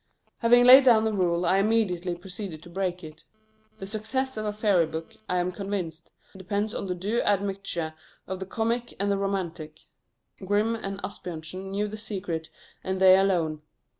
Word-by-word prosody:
Having 245 Hz, +1 st, +5 dB
laid 260 Hz, +2 st, +10 dB
down 230 Hz, -4 st, +6 dB
the 220 Hz, -, 0 dB
rule, 175 Hz, -3 st, +1 dB
I 185 Hz, +3 st, +3 dB
immediately 195 Hz, -5 st, +1 dB
proceeded 180 Hz, -2 st, -7 dB
to 175 Hz, -, -13 dB
break 180 Hz, -1 st, -2 dB
it. 155 Hz, +1 st, -11 dB, 0.5 s
The 195 Hz, -, -7 dB
success 245 Hz, +6 st, -3 dB
of 215 Hz, -1 st, -3 dB
a -, -, 0 dB
fairy 205 Hz, -6 st, +2 dB
book, 160 Hz, +1 st, -7 dB
I 180 Hz, -, +1 dB
am 180 Hz, 0 st, 0 dB
convinced, 180 Hz, -4 st, -5 dB, 0.3 s
depends 200 Hz, +3 st, -2 dB
on -, -, -4 dB
the 180 Hz, -, -2 dB
due 205 Hz, +7 st, -1 dB
admixture 195 Hz, -5 st, -1 dB, 0.3 s
of 190 Hz, 0 st, -5 dB
the 190 Hz, -, -6 dB
comic 235 Hz, +3 st, -2 dB
and 200 Hz, +1 st, +1 dB
the 200 Hz, -, +1 dB
romantic: 170 Hz, -6 st, -3 dB, 0.6 s
Grimm 205 Hz, +4 st, +1 dB
and 195 Hz, -3 st, -5 dB
Asbjörnsen 180 Hz, 0 st, -6 dB
knew 205 Hz, +2 st, -1 dB
the 215 Hz, +1 st, -7 dB
secret, 185 Hz, -7 st, -4 dB, 0.3 s
and 190 Hz, 0 st, -2 dB
they 190 Hz, 0 st, +8 dB
alone. 175 Hz, -6 st, +1 dB
195 Hz, 170 wpm, -27 LUFS, 175-210 Hz, 0.6 s, laid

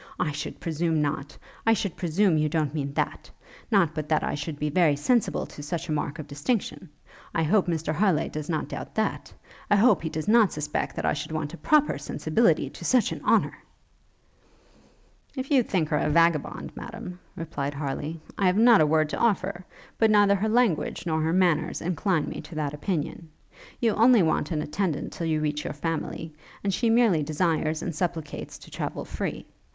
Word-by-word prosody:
I 150 Hz, -, 0 dB
should 145 Hz, -, -6 dB
presume 165 Hz, -1 st, 0 dB
not; 145 Hz, -1 st, -2 dB, 0.3 s
I 225 Hz, -, +4 dB
should 200 Hz, -4 st, -2 dB
presume 180 Hz, +1 st, +2 dB
you 150 Hz, 0 st, +1 dB
don't 155 Hz, -2 st, 0 dB
mean 140 Hz, -3 st, -2 dB
that? -, -, -2 dB, 0.4 s
Not 190 Hz, -8 st, +3 dB
but 155 Hz, -1 st, -4 dB
that 155 Hz, -1 st, +2 dB
I -, -, -1 dB
should 145 Hz, +1 st, -4 dB
be 150 Hz, 0 st, -2 dB
very 160 Hz, -3 st, +4 dB
sensible 235 Hz, -, +1 dB
to -, -, -11 dB
such 165 Hz, +3 st, -4 dB
a -, -, -3 dB
mark 150 Hz, 0 st, -2 dB
of 155 Hz, -, -6 dB
distinction. 165 Hz, -, -3 dB, 0.5 s
I 165 Hz, -, +2 dB
hope 185 Hz, +5 st, +3 dB
Mr 160 Hz, -2 st, -1 dB
Harleigh 180 Hz, -2 st, +2 dB
does 155 Hz, +1 st, -6 dB
not 155 Hz, -3 st, -1 dB
doubt -, -, -7 dB
that? 220 Hz, -, -1 dB, 0.4 s
I 205 Hz, -, +5 dB
hope 225 Hz, +5 st, +5 dB
he 160 Hz, -, -3 dB
does 155 Hz, +2 st, -4 dB
not 220 Hz, -3 st, +5 dB
suspect 150 Hz, 0 st, -3 dB
I -, -, +2 dB
should 150 Hz, -, -5 dB
want 155 Hz, 0 st, -3 dB
a -, -, -7 dB
proper 300 Hz, -, +2 dB
sensibility -, -, +1 dB
to -, -, -10 dB
such 250 Hz, -3 st, +3 dB
an -, -, -6 dB
honour?' -, -, +2 dB, 1.8 s
'If 260 Hz, +1 st, -5 dB
you 270 Hz, -3 st, +6 dB
think 180 Hz, -9 st, -1 dB
her 150 Hz, -, +1 dB
a 150 Hz, -, 0 dB
vagabond, 165 Hz, -1 st, +2 dB
Madam,' 180 Hz, 0 st, -8 dB, 0.2 s
replied 145 Hz, -3 st, -4 dB
Harleigh, 145 Hz, +2 st, -3 dB, 0.2 s
'I 195 Hz, -, +3 dB
have 180 Hz, +2 st, +2 dB
not 230 Hz, -2 st, +7 dB
a 155 Hz, -, +4 dB
word 155 Hz, 0 st, +3 dB
to -, -, -3 dB
offer: 195 Hz, -5 st, 0 dB, 0.3 s
but 220 Hz, -, +5 dB
neither 205 Hz, -1 st, +5 dB
her 205 Hz, +2 st, 0 dB
language 225 Hz, -8 st, +1 dB
nor 160 Hz, -2 st, 0 dB
her 160 Hz, +1 st, +1 dB
manners 175 Hz, -3 st, +2 dB
incline 175 Hz, -1 st, 0 dB
me -, -, -5 dB
to 165 Hz, -, -11 dB
that 150 Hz, -2 st, -2 dB
opinion. 160 Hz, 0 st, -3 dB, 0.5 s
You 230 Hz, -2 st, +2 dB
only 230 Hz, -1 st, +5 dB
want 155 Hz, -2 st, +1 dB
an 155 Hz, -3 st, -1 dB
attendant 155 Hz, -1 st, -2 dB
till 165 Hz, -, -3 dB
you 155 Hz, -1 st, 0 dB
reach 150 Hz, 0 st, -1 dB
your -, -, -4 dB
family, 160 Hz, +1 st, -4 dB, 0.3 s
and 200 Hz, -1 st, 0 dB
she 235 Hz, +3 st, +1 dB
merely 225 Hz, -8 st, +4 dB
desires 155 Hz, +1 st, 0 dB
and 175 Hz, -, -3 dB
supplicates 160 Hz, -3 st, -4 dB
to -, -, -15 dB
travel -, -, -4 dB
free. -, -, -4 dB
165 Hz, 195 wpm, -26 LUFS, 150-195 Hz, 1.8 s, not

